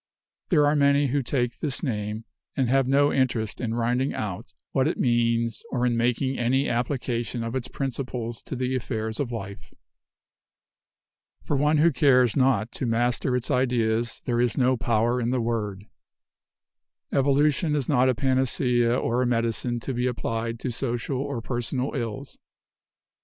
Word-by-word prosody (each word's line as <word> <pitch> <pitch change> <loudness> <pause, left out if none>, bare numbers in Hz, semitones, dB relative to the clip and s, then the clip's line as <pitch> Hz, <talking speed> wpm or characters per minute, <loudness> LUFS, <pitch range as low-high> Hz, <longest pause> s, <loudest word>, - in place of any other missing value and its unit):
There 150 -5 +4
are 145 +1 +3
many 140 -1 +3
who 140 +2 +1
take 125 -1 -2
this 145 -1 -3
name 105 -4 -3 0.3
and 130 -2 +2
have 135 -1 +3
no 140 +2 +3
interest 120 -5 0
in 115 -2 -2
rinding 120 +3 0
out 105 0 -5 0.2
what 135 0 +2
it 160 - -1
means 115 -1 +1
or 125 -1 0
in 120 -1 +1
making 125 +3 0
any 130 +4 +1
application 120 -1 -2
of 115 0 -4
its 130 -1 -3
principles 125 -3 -4
to - - -5
the 130 +1 -1
affairs 110 -3 -3
of 135 -4 -2
life. 100 -4 -8 1.7
For 145 - -1
one 150 +2 +3
who 165 +3 +5
cares 130 -4 +4
not 130 -5 +2
to 130 - -3
master 120 +2 +1
its 125 0 -1
ideas 120 -2 0
there 120 -1 +1
is 120 -2 0
no 130 -1 +3
power 120 +1 +1
in 115 - 0
the 130 0 0
word. 105 -4 -2 1.3
Evolution 145 +3 +2
is 140 -4 -1
not 130 -3 +3
a 130 - +2
panacea 125 -2 +1
or 120 +2 0
a 125 - +1
medicine 120 0 0
to 135 - -3
be 125 +1 0
applied 115 -1 -3
to 130 - -2
social 120 +2 -1
or 140 -3 -3
personal 125 +2 -2
ills. 130 +1 -5
125 Hz, 160 wpm, -25 LUFS, 115-135 Hz, 1.7 s, who